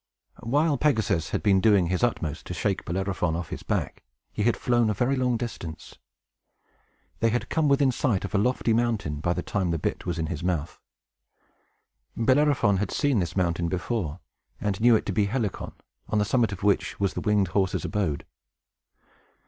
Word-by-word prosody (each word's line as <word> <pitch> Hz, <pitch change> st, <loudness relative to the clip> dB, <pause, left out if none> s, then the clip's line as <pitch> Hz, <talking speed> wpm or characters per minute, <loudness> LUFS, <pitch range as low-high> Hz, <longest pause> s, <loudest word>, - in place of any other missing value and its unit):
While 145 Hz, +4 st, +1 dB
Pegasus 110 Hz, -, +1 dB
had -, -, -2 dB
been 95 Hz, -2 st, +4 dB
doing 100 Hz, -3 st, +4 dB
his 90 Hz, +1 st, -1 dB
utmost 80 Hz, -11 st, -1 dB
to 90 Hz, -, -5 dB
shake 100 Hz, +3 st, -1 dB
Bellerophon 90 Hz, -2 st, -1 dB
off 85 Hz, -1 st, -4 dB
his -, -, -6 dB
back, -, -, -2 dB, 0.3 s
he -, -, -4 dB
had 115 Hz, +3 st, +2 dB
flown 120 Hz, -2 st, +2 dB
a 105 Hz, -, 0 dB
very 125 Hz, +6 st, +1 dB
long 125 Hz, -2 st, +1 dB
distance; 100 Hz, -9 st, -6 dB
and -, -, -36 dB
they 115 Hz, -, +3 dB
had 120 Hz, +2 st, -2 dB
come 160 Hz, -3 st, +2 dB
within 140 Hz, -1 st, +4 dB
sight 115 Hz, -6 st, 0 dB
of 100 Hz, -, -7 dB
a 100 Hz, -, +3 dB
lofty 120 Hz, +1 st, +1 dB
mountain 110 Hz, -11 st, 0 dB
by 85 Hz, +3 st, 0 dB
the 90 Hz, -, -3 dB
time 95 Hz, -4 st, -1 dB
the 85 Hz, -, 0 dB
bit -, -, -3 dB
was 90 Hz, -, -2 dB
in 80 Hz, -, -1 dB
his 80 Hz, -1 st, -4 dB
mouth. 85 Hz, -3 st, -2 dB, 1.4 s
Bellerophon 130 Hz, -4 st, +3 dB
had 100 Hz, 0 st, -1 dB
seen 140 Hz, -6 st, +1 dB
this 85 Hz, -1 st, -2 dB
mountain 85 Hz, -2 st, +1 dB
before, 90 Hz, -3 st, -2 dB, 0.4 s
and 100 Hz, 0 st, -2 dB
knew 120 Hz, 0 st, +6 dB
it -, -, 0 dB
to 100 Hz, -, -2 dB
be 100 Hz, +2 st, +2 dB
Helicon, 110 Hz, -2 st, -3 dB, 0.3 s
on 110 Hz, -, -1 dB
the 105 Hz, -, +2 dB
summit 115 Hz, +1 st, +2 dB
of 95 Hz, -1 st, -7 dB
which 100 Hz, -1 st, +1 dB
was 100 Hz, -1 st, 0 dB
the -, -, -4 dB
winged 105 Hz, -3 st, +2 dB
horse's 95 Hz, +1 st, 0 dB
abode. 95 Hz, -9 st, -2 dB
105 Hz, 190 wpm, -26 LUFS, 90-120 Hz, 1.4 s, knew